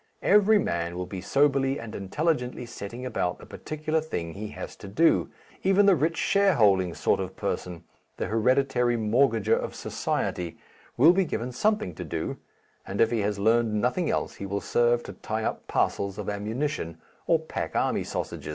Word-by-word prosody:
Every 210 Hz, +2 st, +5 dB
man 85 Hz, -, -1 dB
will 90 Hz, -, -3 dB
be 90 Hz, 0 st, -6 dB
soberly 140 Hz, +1 st, +2 dB
and 115 Hz, -2 st, -8 dB
intelligently 125 Hz, -, -1 dB
setting 120 Hz, +1 st, -7 dB
about 95 Hz, -8 st, -1 dB
the -, -, -13 dB
particular 155 Hz, +1 st, -3 dB
thing 85 Hz, -, -4 dB
he 105 Hz, +2 st, -6 dB
has -, -, -8 dB
to 100 Hz, -, -10 dB
do 160 Hz, +12 st, +3 dB, 0.3 s
even 195 Hz, +2 st, +4 dB
the 200 Hz, -2 st, +6 dB
rich 160 Hz, +2 st, 0 dB
shareholding 105 Hz, -, +3 dB
sort -, -, +1 dB
of -, -, -4 dB
person, 90 Hz, -2 st, -4 dB, 0.3 s
the -, -, -2 dB
hereditary 125 Hz, +1 st, +2 dB
mortgager 115 Hz, 0 st, +2 dB
of -, -, -4 dB
society, 85 Hz, -2 st, -2 dB, 0.4 s
will 155 Hz, +8 st, +7 dB
be 190 Hz, +1 st, +3 dB
given 125 Hz, -7 st, -3 dB
something 215 Hz, -, 0 dB
to 90 Hz, -, -6 dB
do, 80 Hz, -1 st, -4 dB, 0.5 s
and 95 Hz, -, -6 dB
if 115 Hz, -, +4 dB
he 115 Hz, -, +1 dB
has 105 Hz, 0 st, 0 dB
learnt 115 Hz, +3 st, +3 dB
nothing 125 Hz, -, 0 dB
else -, -, -1 dB
he 100 Hz, -, -5 dB
will 100 Hz, +1 st, -2 dB
serve 120 Hz, +2 st, +2 dB
to -, -, -8 dB
tie 110 Hz, 0 st, -4 dB
up -, -, -3 dB
parcels 100 Hz, 0 st, 0 dB
of 105 Hz, -2 st, -4 dB
ammunition 105 Hz, -, -3 dB, 0.3 s
or -, -, +5 dB
pack -, -, -5 dB
army -, -, +1 dB
sausage. -, -, -5 dB
115 Hz, 175 wpm, -27 LUFS, 100-150 Hz, 0.5 s, will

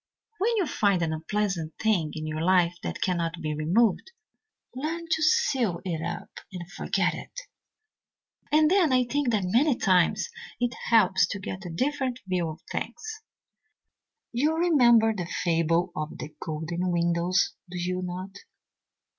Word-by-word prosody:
When 455 Hz, +4 st, +1 dB
you 390 Hz, -, +2 dB
find 200 Hz, -, +1 dB
an 160 Hz, -1 st, -1 dB
unpleasant 165 Hz, -1 st, -2 dB
thing 185 Hz, -9 st, +1 dB
in 155 Hz, 0 st, -4 dB
your 155 Hz, 0 st, -3 dB
life 175 Hz, 0 st, +3 dB
that -, -, -3 dB
cannot 170 Hz, -2 st, -1 dB
be 155 Hz, -2 st, -2 dB
removed, 185 Hz, -, +2 dB, 0.7 s
learn 325 Hz, +5 st, -3 dB
to 320 Hz, -1 st, 0 dB
seal 270 Hz, -, +2 dB
it 165 Hz, -4 st, -2 dB
up 170 Hz, -, -6 dB
and 175 Hz, -3 st, -7 dB
forget -, -, 0 dB
it. -, -, -8 dB, 1.1 s
"And 305 Hz, +1 st, +5 dB
then 365 Hz, -7 st, +4 dB
I 255 Hz, 0 st, +4 dB
think 280 Hz, +1 st, 0 dB
that 215 Hz, -4 st, +1 dB
many 245 Hz, +9 st, +3 dB
times 185 Hz, -, +2 dB, 0.3 s
it 245 Hz, 0 st, 0 dB, 0.2 s
helps 205 Hz, -5 st, +4 dB
to 200 Hz, -, -4 dB
get 190 Hz, 0 st, -6 dB
a -, -, -6 dB
different 255 Hz, -, -1 dB
view 180 Hz, -3 st, -1 dB
of 155 Hz, +1 st, -9 dB
things. 435 Hz, -, -5 dB, 1.1 s
You 295 Hz, +7 st, +1 dB
remember 240 Hz, -10 st, +5 dB
the 180 Hz, -5 st, -4 dB
fable 170 Hz, +1 st, +1 dB
of 155 Hz, 0 st, -4 dB
the 150 Hz, -, -8 dB
golden 165 Hz, +3 st, -3 dB
windows, 170 Hz, +1 st, +1 dB, 0.2 s
do 180 Hz, -, -6 dB
you 180 Hz, +1 st, -2 dB
not? 185 Hz, +2 st, -6 dB
190 Hz, 150 wpm, -27 LUFS, 170-255 Hz, 1.1 s, And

